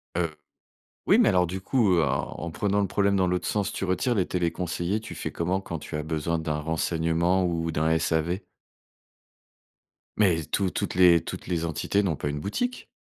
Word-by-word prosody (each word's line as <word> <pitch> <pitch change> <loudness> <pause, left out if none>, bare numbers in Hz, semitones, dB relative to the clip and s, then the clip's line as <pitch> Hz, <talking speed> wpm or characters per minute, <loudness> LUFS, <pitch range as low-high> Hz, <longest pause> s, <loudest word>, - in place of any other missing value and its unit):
Heu, 85 -3 -1 0.7
oui, - - +5
mais - - +5
alors, 90 -1 +3
du 95 +3 -5
coup, 110 -1 +2
heu, 85 - +4
en - - -1
en 85 - -4
prenant 100 +4 0
le 100 - +1
problème 100 +1 +1
dans 95 -1 +3
l'autre 90 0 -1
sens, 105 -2 -1
tu - - -3
retires 95 +7 +1
les 95 -5 +1
téléconseillers. 90 +3 -1
Tu 110 - -8
fais - - -4
comment, 90 +3 -1
quand 85 -4 -5
tu 75 - -6
as 75 - -2
besoin 80 +1 -1
d'un 80 -2 -2
renseignement 80 +3 +1
ou 85 -2 -1
d'un 80 0 0
SAV? 80 +2 0 1.8
Mais 90 -6 +3
tou 95 +7 0
toutes - - -3
les 90 -2 +6
toutes - - -7
les 85 -2 -1
entités 90 +5 0
n'ont 85 -6 0
pas - - -3
une 75 0 -4
boutique. 245 - -3
85 Hz, 195 wpm, -26 LUFS, 80-95 Hz, 1.8 s, les